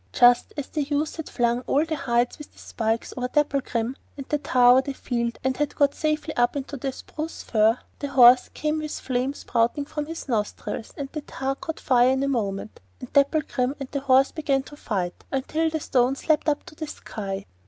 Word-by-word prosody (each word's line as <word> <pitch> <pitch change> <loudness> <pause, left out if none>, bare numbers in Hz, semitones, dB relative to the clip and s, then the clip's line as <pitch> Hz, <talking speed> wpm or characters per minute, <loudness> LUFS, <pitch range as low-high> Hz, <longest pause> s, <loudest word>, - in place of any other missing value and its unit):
Just 245 0 +5
as 290 - -3
the 305 - -2
youth 290 +2 -1
had 320 - -6
flung 240 0 +1
all 295 +3 +3
the 320 -1 -2
hides 240 -2 0
with 300 - -10
the - - -27
spikes 225 0 -2
over 250 -1 -2
Dapplegrim, 265 -4 0 0.2
and 275 - -7
the 295 - +1
tar 250 -3 +5
over 255 +1 +6
the 275 0 -5
field, 235 -3 -2
and 260 0 +1
had 295 +1 -2
got 285 -2 +3
safely 310 0 -1
up 240 +2 +2
into 280 0 -4
the 270 0 -3
spruce 310 +4 -7
fir, 220 +1 +3 0.2
a 285 - -1
horse 250 -2 +7
came 305 0 -1
with 305 -1 -4
flame 255 +2 -1
spouting 240 +4 0
from 300 0 -4
his 330 -1 -7
nostrils, 220 -1 -3
and 275 -1 -4
the 305 - -4
tar 270 -1 -3
caught 320 +3 -6
fire 250 -1 +4
in 265 +1 +1
a - - +1
moment; 215 -6 -2 0.2
and - - -10
Dapplegrim 280 -2 +2
and 275 -2 -6
the 280 - -1
horse 270 0 +4
began 280 -4 0
to 290 - -12
fight 185 -10 -3
until 310 +4 0
the 315 0 -2
stones 260 -1 0
leapt 310 -1 +3
up 290 - 0
to 355 - -12
the 310 0 -6
sky. 195 -7 -6
270 Hz, 210 wpm, -25 LUFS, 245-295 Hz, 0.2 s, horse